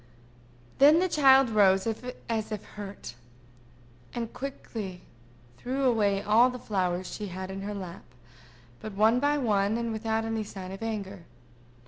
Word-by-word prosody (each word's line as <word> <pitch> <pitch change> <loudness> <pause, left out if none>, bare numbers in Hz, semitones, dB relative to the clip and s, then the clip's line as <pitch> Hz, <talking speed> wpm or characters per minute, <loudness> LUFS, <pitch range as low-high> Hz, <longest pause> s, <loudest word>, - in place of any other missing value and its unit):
Then 290 +4 +8
the 370 +2 +2
child 270 -6 +5
rose 195 -3 +4 0.4
as 220 -1 -2
if 210 -2 -5
hurt, 200 - -9 1.0
and 230 -2 -4
quickly 220 -9 -6 0.6
threw 265 +3 -2
away 205 -6 +2
all 220 +4 +5
the 250 - -6
flowers 185 -5 -1
she 210 - -5
had 185 +1 -6
in 195 0 -6
her 205 +1 -4
lap, 185 -4 -8 0.7
but 215 - -7
one 220 +4 +4
by 290 +2 +2
one, 210 -4 +1
and 235 -1 -2
without 220 0 -1
any 225 -1 -2
sign 190 -2 -8
of 195 - -8
anger. 200 -5 -5
215 Hz, 145 wpm, -28 LUFS, 195-240 Hz, 1.0 s, Then